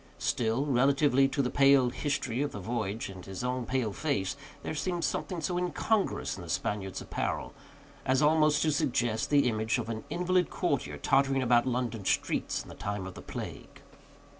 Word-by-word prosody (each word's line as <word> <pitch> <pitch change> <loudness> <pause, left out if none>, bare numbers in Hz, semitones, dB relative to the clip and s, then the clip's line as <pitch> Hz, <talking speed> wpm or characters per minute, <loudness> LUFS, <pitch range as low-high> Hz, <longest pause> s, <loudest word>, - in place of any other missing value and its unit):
Still, 120 +4 0
relatively 135 0 +4
to 140 +1 0
the 125 - -1
pale 135 -3 +5
history 135 -4 -1
of 145 - -1
the 100 - -5
voyage, 110 +1 -3
and 95 -2 -9
his 95 +3 -6
own 125 -1 -2
pale 125 -5 0
face, 135 -11 -1 0.3
there - - -3
seemed 175 +2 -2
something 180 0 -2
so 175 +3 -1
incongruous 195 +4 0
in - - -8
the - - -9
Spaniard's 95 -2 -2
apparel, - - -3 0.5
as 130 0 +2
almost 155 0 +4
to 155 - +2
suggest 120 -5 0
the 145 -3 +4
image 110 +1 0
of 115 -2 -4
an 110 -1 -4
invalid 180 +1 +1
courtier 125 - -1
tottering 135 - +2
about 120 0 +4
London 120 -4 -1
streets - - 0
in - - -14
the - - -8
time 100 -2 -4
of 95 - -7
the - - -10
plague. - - -8
130 Hz, 180 wpm, -30 LUFS, 110-145 Hz, 0.5 s, pale